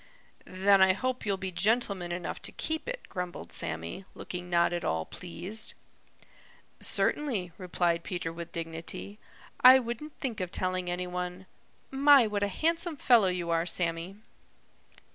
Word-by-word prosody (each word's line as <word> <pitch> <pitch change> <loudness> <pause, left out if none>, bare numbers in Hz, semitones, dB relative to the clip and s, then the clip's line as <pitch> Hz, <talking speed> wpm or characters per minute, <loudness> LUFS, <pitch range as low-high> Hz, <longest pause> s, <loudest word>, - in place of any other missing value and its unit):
"Then 195 +1 +3
I 190 0 +6
hope 255 +3 -3
you'll 200 -1 +1
be 190 0 -4
gentleman 200 -2 +1
enough 175 0 -4
to - - -4
keep 320 +5 -3
it," - - -4
grumbled 180 -2 -6
Sammy, 85 - -4
looking 180 0 -7
not 170 0 +3
at 175 - -2
all 80 0 -1
pleased. 185 +5 -2 1.0
"Certainly," 225 - 0
replied 175 -2 0
Peter 175 -3 -4
with 170 0 -8
dignity. 165 +5 -4 0.4
"I 255 +1 +11
wouldn't 255 +5 -5
think 235 -5 -3
of 180 -2 -3
telling 185 -1 -1
any 180 +1 -2
one. 180 +1 -5 0.5
My, 275 -1 +6
what 210 -1 -2
a 205 - +2
handsome 330 - 0
fellow 235 -7 +5
you 180 -2 -1
are, 165 +1 +1
Sammy." 170 +2 -1
185 Hz, 145 wpm, -29 LUFS, 175-225 Hz, 1.0 s, I